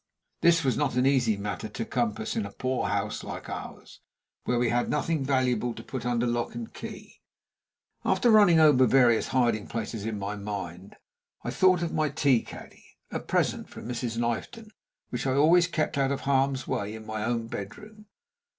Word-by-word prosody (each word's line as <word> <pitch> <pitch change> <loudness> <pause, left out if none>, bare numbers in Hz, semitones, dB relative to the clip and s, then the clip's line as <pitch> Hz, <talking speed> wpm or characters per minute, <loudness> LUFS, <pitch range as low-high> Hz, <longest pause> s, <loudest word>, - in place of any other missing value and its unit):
This 165 -1 +4
was 130 - +1
not 145 -4 0
an 125 +1 +2
easy 125 -6 +3
matter 100 +1 -4
to 115 +2 -5
compass 110 -3 -2
in 110 - 0
a 100 - -6
poor 130 +4 -2
house 100 +1 -2
like - - -7
ours, - - -8 0.5
where 125 - +1
we 120 -1 +2
had 120 +1 0
nothing 150 0 0
valuable 125 -3 0
to - - -9
put 125 -2 -5
under 120 0 +1
lock 120 0 -1
and 230 -1 -7
key. - - -10 0.8
After 240 - +3
running 205 -7 +6
over 145 -5 +6
various 120 -2 +4
hiding 120 -5 +1
places 110 -2 -4
in 110 -1 -3
my 100 +1 -4
mind, 100 -3 -6 0.5
I - - -3
thought 185 -2 +3
of 170 - -3
my 155 -1 +1
tea 140 -4 +2
caddy, - - -13
a - - -2
present - - -1
from - - -9
Mrs. 120 -1 -3
Knifton, 120 - -3 0.4
which 125 +2 -2
I 130 - +1
always 170 +4 +5
kept 155 -4 -1
out 135 0 +2
of 140 - -2
harm's 135 -1 +1
way 100 +2 -2
in 110 0 -10
my 110 -1 -4
own 115 0 -1
bedroom. 210 - -9
125 Hz, 185 wpm, -27 LUFS, 110-140 Hz, 0.8 s, running